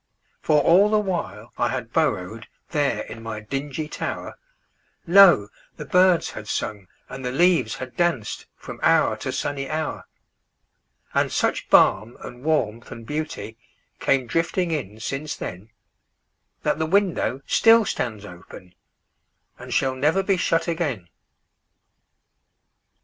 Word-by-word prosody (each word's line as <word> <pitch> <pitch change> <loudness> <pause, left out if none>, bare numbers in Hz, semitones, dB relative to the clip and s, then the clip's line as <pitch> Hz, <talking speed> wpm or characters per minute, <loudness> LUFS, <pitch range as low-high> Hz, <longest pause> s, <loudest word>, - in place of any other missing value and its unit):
For 150 - +3
all 190 +7 +5
the 215 - +3
while 180 - -3
I 120 - +2
had 120 -2 -5
burrowedThere 130 - -2
in 115 - -9
my 115 -1 -5
dingy 140 +6 -4
tower, - - -5 0.7
Lo! 175 - +7 0.3
the - - -7
birds 180 -1 +3
had 105 - -9
sung 105 -2 -4 0.2
and 135 0 -8
the 125 - -2
leaves 165 -6 +2
had 130 -1 -8
dancedFrom 170 -12 -3
hour - - +3
to - - -4
sunny 135 -1 -3
hour. 155 0 -3 1.1
And - - +1
such - - -1
balm 110 +4 +4
and 125 0 -10
warmth 120 -8 -1
and 115 -1 -9
beautyCame 135 -2 -4
drifting 170 +6 -1
in 110 -9 -4
since 135 +6 -4
then, 90 +5 -7 0.9
That - - 0
the 160 - 0
window 180 -7 +1
still 225 -1 +5
stands 110 - -3
openAnd 90 -1 -13 1.0
shall 130 -1 +1
never 150 +9 +1
be 195 0 +2
shut 165 -1 +1
again. 145 - -2
135 Hz, 120 wpm, -23 LUFS, 115-170 Hz, 1.1 s, Lo